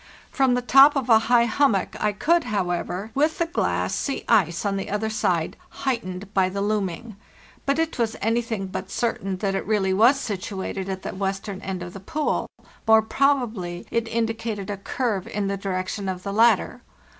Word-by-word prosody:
From 265 -2 +3
the 250 - -1
top 275 +4 +7
of 265 -3 -1
a 220 - +8
high 240 -1 +5
hummock 235 -6 +1
I 210 - +3
could, 330 +11 +2
however, 190 -1 -2
with 305 +4 +1
the 340 - +1
glass, 335 +2 -1
see 275 - -2
ice 180 -5 +2
on 200 -1 0
the 195 - -4
other 215 +2 -1
side, 175 -6 0 0.3
heightened 200 -6 -3
by 190 -1 +3
the 200 +2 -4
looming. 205 +1 -2 0.5
But 275 +1 +2
it 325 -4 -1
was 225 -2 0
anything 225 -2 -1
but 190 0 -6
certain 195 -5 -2
that 195 0 -1
it 195 - -1
really 195 -3 +1
was 240 +8 +5
situated 195 -3 -4
at 190 -1 -4
the - - -4
western 195 0 -3
end 185 -2 -4
of 175 0 -8
the 195 - -8
pool; 305 - -1 0.4
more 220 0 +6
probably, 220 -10 0
it 230 0 0
indicated 225 -3 -2
a 200 - -4
curve 205 -1 -2
in 205 -1 -2
the 200 - -1
direction 195 0 -3
of 185 -1 -5
the 200 - -4
latter. 230 +2 +3
210 Hz, 185 wpm, -24 LUFS, 190-235 Hz, 0.5 s, a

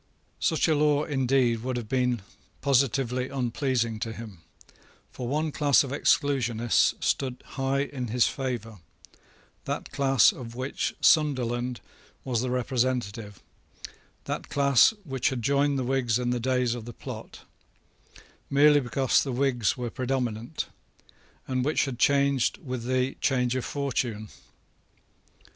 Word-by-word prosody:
Such 160 -2 +1
a 160 - +3
law, 150 0 +2
indeed, 130 -5 +1
would 125 +1 -3
have 120 -3 -5
been 125 -3 0 0.4
positively 130 -2 +1
unpleasing 125 -3 -1
to 115 -1 -3
him; 110 -6 -10 0.7
for 125 - -6
one 155 +4 -1
class 145 -2 +4
of 135 - -6
Exclusionists 120 -5 +2
stood 130 -2 -1
high 135 0 -1
in 130 -3 -5
his 120 +2 +2
favour, 120 -6 -4 0.9
that - - -4
class 135 -5 +4
of 120 -2 -9
which 130 +2 -3
Sunderland 125 -5 +2 0.4
was 120 -4 -1
the 130 - -2
representative, 120 -5 -2 0.8
that - - -5
class 140 - +5
which 135 -6 -1
had 125 -3 -4
joined 140 +2 +2
the 130 - -1
Whigs 125 -3 +1
in 125 -1 -1
the 125 - 0
days 125 -1 +1
of 120 -2 -7
the 120 - -8
plot, - - -9 1.1
merely 145 +1 +5
because 130 -1 +1
the 135 - -3
Whigs 125 -1 +1
were 120 -2 -4
predominant, 125 0 -2 0.8
and 130 -1 -1
which 150 +3 +1
had 130 -4 -6
changed 140 -2 +2
with 125 -3 -6
the 130 +1 0
change 125 -2 +1
of 130 - -2
fortune. 120 -6 -2
130 Hz, 135 wpm, -27 LUFS, 120-140 Hz, 1.1 s, class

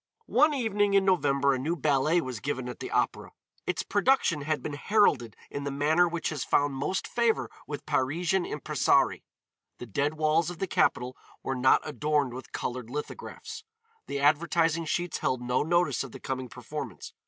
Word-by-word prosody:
One 300 +6 +4
evening 205 -5 +1
in 195 -1 +4
November 140 -7 +3
a 130 - -1
new 160 +6 -1
ballet 150 +2 +2
was 130 -5 -5
given 130 0 -3
at 125 - -7
the - - -5
Opéra. - - 0 0.4
Its - - -1
production 205 - +2
had 155 +1 -2
been 150 - -4
heralded 145 - +2 0.2
in 140 - -4
the 140 - -2
manner 150 +5 +3
which 170 -1 -2
has 150 -4 -3
found 145 0 +2
most 140 +8 -2
favor 235 -2 +1 0.2
with 145 -1 -6
Parisian 160 +6 +1
impressarii. - - +1 0.6
The - - -7
dead 145 +7 -1
walls 155 +2 +2
of 175 - -7
the 195 - -1
capital 125 -7 +1 0.3
were 135 - -1
not 130 +3 +3
adorned 150 -2 0
with 130 +1 -9
colored 125 -2 -4
lithographs. 445 - -7 0.4
The 140 - -3
advertising 165 +3 +2
sheets 175 +2 -2
held 130 - 0
no 125 +1 +1
notice 175 +1 +1
of 135 - -10
the - - -8
coming 130 -1 -4
performance. - - -7
150 Hz, 175 wpm, -28 LUFS, 135-175 Hz, 0.6 s, One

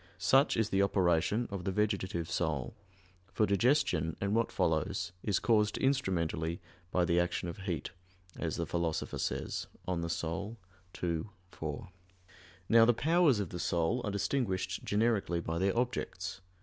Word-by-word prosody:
Such 130 +11 +4
is 110 -1 +1
the 95 -1 +2
operation 95 +3 +2
of 100 -2 -4
the 95 - -1
vegetative 95 -4 -1
soul; 80 -7 -1 0.6
for 105 +3 +2
digestion, 100 - +2
and 100 +1 0
what 115 +1 +1
follows, 85 +4 0
is 100 -2 +1
caused 105 -2 +2
instrumentally 85 - 0 0.3
by 90 -1 +2
the 85 0 +3
action 90 0 -1
of 85 +3 -6
heat, 90 -5 -3 0.4
as - - -2
the - - -2
Philosopher 85 -2 -2
says - - -2 0.2
(De - - -2
Anima 85 -2 -1 0.9
ii, 85 -2 0 0.3
4). 80 +3 -5 0.8
Now 115 0 +7
the 120 0 +4
powers 160 -3 +3
of 100 -5 -2
the 90 - -6
soul 85 +9 +1
are - - -1
distinguished 100 -3 -1
generically 105 -5 +1
by 85 0 -3
their 95 +4 +1
objects. 100 -7 -2
95 Hz, 150 wpm, -32 LUFS, 85-110 Hz, 0.9 s, Now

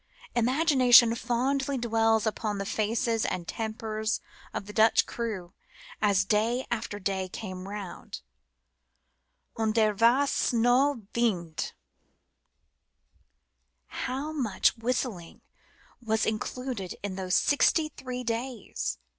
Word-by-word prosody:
Imagination 250 -2 +5
fondly 270 +4 -1
dwells 225 -2 +2
upon 215 -1 -2
the 195 - -3
faces 225 +2 0
and 175 -2 -3
tempers 220 -1 -3 0.3
of - - -5
the 210 - -9
Dutch 220 +1 +4
crew 205 -6 -5 0.5
as 200 -1 +3
day 225 +5 +1
after 220 -3 -3
day 190 -1 -2
came 185 -2 -7
round 200 -2 -7 0.7
" 65 - -38
und 220 -1 +1
der 215 -2 +3
vass 240 +7 +3
no 245 +2 +3
vindt." 180 -9 -1 2.2
How 275 +4 -3
much 245 -11 +1
whistling 230 -7 -3 0.6
was 220 -1 +1
included 220 -2 -3
in 200 -2 -3
those 185 -1 -1
sixty 305 +2 +3
three 255 -3 -6
days? 230 - -3
225 Hz, 105 wpm, -28 LUFS, 205-245 Hz, 2.2 s, Imagination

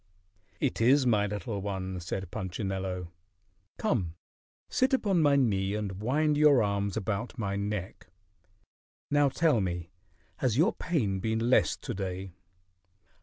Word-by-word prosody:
"It - - -1
is, 130 +4 +5
my 105 -4 +3
little 105 0 -4
one," 95 -2 -4
said 90 +1 -5
Punchinello. 95 -1 -4 0.7
"Come 95 - -1 0.5
sit 265 +1 +2
upon 195 -9 +1
my 145 -2 +4
knee 100 -7 +1
and 100 -2 -4
wind 150 +6 +2
your 145 -5 +6
arms 100 0 -1
about 110 +3 -3
my 100 -4 -2
neck. 100 -3 -4 1.0
Now 145 -1 +4
tell 150 -5 +2
me, 90 -2 -3 0.5
has 125 -3 0
your 175 +10 +4
pain 115 - -1
been 110 +4 0
less - - +4
to 120 - -5
day?" 95 -2 -5
105 Hz, 130 wpm, -29 LUFS, 95-130 Hz, 1.0 s, your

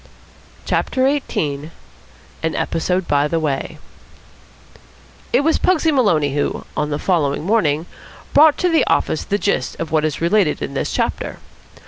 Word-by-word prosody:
CHAPTER 260 - 0
XVIII 155 - -2 0.7
AN 160 0 -1
EPISODE 180 +2 -1
BY 145 0 +2
THE 165 +2 -1
WAY 145 -4 -2 1.5
It 250 - +3
was 320 +2 +2
Pugsy 325 -3 +2
Maloney 165 - +2
who, 145 - -2
on 150 - -1
the 145 - -1
following 150 -5 0
morning, 165 -6 +1 0.5
brought 300 +1 +6
to 360 - +1
the 325 -2 +3
office 160 - +1
the 205 - -1
gist 200 -11 -1
of 165 - -4
what 155 -1 +2
is 155 -2 -1
related 170 -1 +2
in 70 -1 -5
this - - -2
chapter. - - -2
165 Hz, 145 wpm, -19 LUFS, 150-230 Hz, 1.5 s, brought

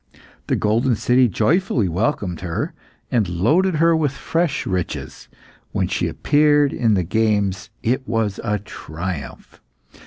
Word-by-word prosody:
The - - +1
golden 115 +4 +1
city 125 +3 +3
joyfully 120 - +1
welcomed 90 - -1
her, 85 -3 -3 0.4
and 110 -7 +1
loaded 160 - +2
her 165 +2 +4
with 150 -4 0
fresh 165 0 -1
riches; 90 -2 -4 0.5
when - - 0
she - - -1
appeared 145 -1 +3
in 115 -4 +2
the 90 - +1
games 100 -1 0
it 130 +3 0
was 110 -3 -1
a 105 0 0
triumph. 85 -4 -7
110 Hz, 130 wpm, -21 LUFS, 95-145 Hz, 0.5 s, her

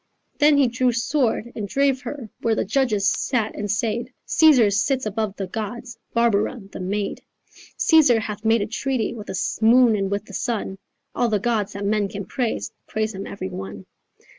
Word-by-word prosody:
"Then 295 0 +5
he 275 -2 +5
drew 245 +1 +1
sword 240 -1 0
and 205 -2 -4
drave 275 +3 +1
her 285 -5 -6
Where 225 -1 +1
the - - -1
judges 215 -3 +1
sat 225 -5 0
and 205 0 -4
said 230 +3 -1 0.2
'Caesar 265 -10 +5
sits 255 +5 +1
above 215 -1 -2
the 195 - -4
gods, 225 +5 -6 0.2
Barbara 235 +1 +1
the - - -8
maid. 200 +2 -3 0.6
Caesar 295 -8 +5
hath 210 -1 -5
made 225 -1 +3
a - - -2
treaty 245 0 -2
With 215 -3 -9
the 190 - -3 0.2
moon 235 0 +6
and 195 -2 -1
with 200 +1 -2
the - - -13
sun, 210 -5 -3 0.3
All 240 - +1
the 215 - +2
gods 215 -1 -1
that 200 0 -4
men 205 0 +1
can 200 -1 -6
praise 240 +3 -2 0.2
Praise 220 0 -2
him 195 +1 -6
every 145 - -5
one. 95 +1 -7
220 Hz, 185 wpm, -23 LUFS, 205-245 Hz, 0.6 s, moon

